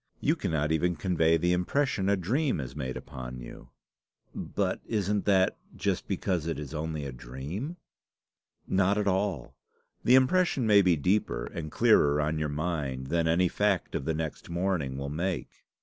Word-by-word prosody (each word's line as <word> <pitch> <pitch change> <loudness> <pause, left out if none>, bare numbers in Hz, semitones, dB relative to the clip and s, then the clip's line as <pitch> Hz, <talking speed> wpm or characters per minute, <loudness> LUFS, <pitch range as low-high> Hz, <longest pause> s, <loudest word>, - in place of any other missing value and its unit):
You - - +2
cannot 75 -1 -1
even 85 +2 +1
convey 80 -1 +2
the 90 +2 +2
impression 95 +2 0
a 100 - +4
dream 130 - 0
has 65 -4 -6
made 65 -4 -4
upon 65 0 -7
you." - - -11 0.6
"But - - -2
isn't 105 -2 0
that 95 -2 +3 0.2
just - - -1
because 85 -4 -1
it 80 - -2
is 75 0 -7
only 80 -1 -3
a 70 - -4
dream?" 70 - -6 0.9
"Not 95 +2 +2
at 105 -1 0
all. 95 -7 -1 0.5
The 125 - +6
impression 130 0 +3
may 105 -2 +6
be 90 -3 +4
deeper 90 +8 0
and 75 -2 -6
clearer 75 0 +4
on 75 +1 0
your 75 -1 -1
mind 70 -4 -3
than 85 -1 +1
any 85 +3 +3
fact 100 0 0
of 65 - -2
the 80 - 0
next 80 +1 -5
morning 85 -6 -1
will 70 0 -4
make. 85 +3 -4
85 Hz, 165 wpm, -29 LUFS, 75-100 Hz, 0.9 s, The